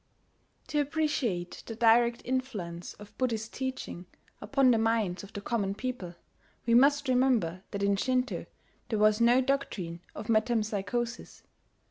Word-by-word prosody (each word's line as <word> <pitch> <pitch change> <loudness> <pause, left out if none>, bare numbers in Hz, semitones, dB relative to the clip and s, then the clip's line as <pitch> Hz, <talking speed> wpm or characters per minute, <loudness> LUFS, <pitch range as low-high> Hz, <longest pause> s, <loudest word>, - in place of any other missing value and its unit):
To 295 - +1
appreciate 275 - -1
the 225 - -5
direct 235 +1 +4
influence 215 -10 -3
of 205 0 -14
Buddhist 225 -4 -1
teaching 260 -9 -5 0.3
upon 255 +4 +3
the 230 - +3
minds 220 -5 +1
of 200 - -11
the 200 - -6
common 200 -3 -1
people, 215 -7 -5 0.5
we 230 - +2
must 285 +4 +5
remember 250 -9 +2
that 200 -1 -3
in 200 0 +3
Shinto 255 +4 -1 0.4
there 220 - 0
was 215 +1 +4
no 240 +2 +5
doctrine 235 -11 -2 0.2
of - - -6
metempsychosis. 225 0 -1
230 Hz, 135 wpm, -29 LUFS, 200-255 Hz, 0.5 s, must